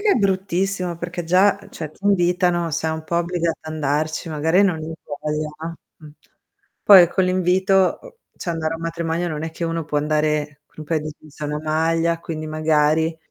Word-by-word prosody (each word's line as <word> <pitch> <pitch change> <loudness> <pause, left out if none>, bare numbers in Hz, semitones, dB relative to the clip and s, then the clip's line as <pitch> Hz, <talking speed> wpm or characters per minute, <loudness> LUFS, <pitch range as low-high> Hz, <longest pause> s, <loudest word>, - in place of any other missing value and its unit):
che 415 0 +2
è - - +5
bruttissimo 190 -3 0
perché 175 0 -5
già, 185 +4 +4
ehm, - - -15
cioè 155 -3 -6
ti 195 - -20
invitano, 175 -3 +2
sei 160 +1 -1
un 160 - -5
po' 170 - -2
obbligato 170 -1 -1
ad 155 - -7
andarci, 155 +2 -1
magari 160 +5 +2
non 190 -4 +2
hai 160 +1 -6 0.3
voglia 150 0 -2
a 165 +1 -5 0.2
mh. 155 - -13 0.8
Poi 185 -4 +9
con 190 +2 +1
l'invito, 185 +1 +2
uhm, - - -13 0.2
cioè 175 - -4
andare 165 -1 -2
a - - -4
un 165 - -10
matrimonio 165 +1 -2
non 155 -1 -4
è 160 - -3
che 165 +1 -5
uno 165 -1 -2
può 150 -1 -1
andare 150 -1 -1
con - - -34
un 155 - -6
paio 155 +1 0
di 155 0 -6
jeans 155 -1 -18
e - - -3
una 150 0 -3
maglia 165 +2 +1
quindi 155 -2 -5
magari 155 +1 +1
165 Hz, 205 wpm, -21 LUFS, 155-175 Hz, 0.8 s, Poi